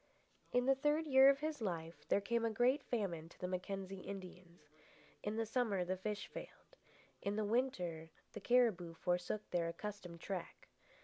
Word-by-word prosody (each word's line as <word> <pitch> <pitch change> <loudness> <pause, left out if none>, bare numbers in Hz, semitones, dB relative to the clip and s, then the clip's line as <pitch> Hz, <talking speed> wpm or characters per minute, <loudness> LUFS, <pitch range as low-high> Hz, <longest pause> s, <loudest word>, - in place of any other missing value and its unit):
In 245 0 +3
the 270 - +6
third 295 +4 +2
year 265 -2 +8
of 275 0 +3
his 305 -3 -2
life 170 -5 -4
there 200 - +4
came 235 +3 0
a 230 - +2
great 245 +6 +3
famine 180 -11 -2
to - - -18
the 180 - -2
Mackenzie 190 +1 -4
Indians. 180 -3 -9 0.6
In 210 +1 -2
the 225 0 0
summer 220 -5 +1
the 185 +1 0
fish 205 +2 -3
failed. - - -10 0.5
In 200 +1 -1
the 215 0 0
winter 180 -9 0 0.2
the 210 - -6
cariboo 205 -8 +3
forsook 180 +5 -1
their 170 -2 +1
accustomed 180 -1 -6
track. 180 -1 -6
200 Hz, 170 wpm, -38 LUFS, 180-245 Hz, 0.6 s, year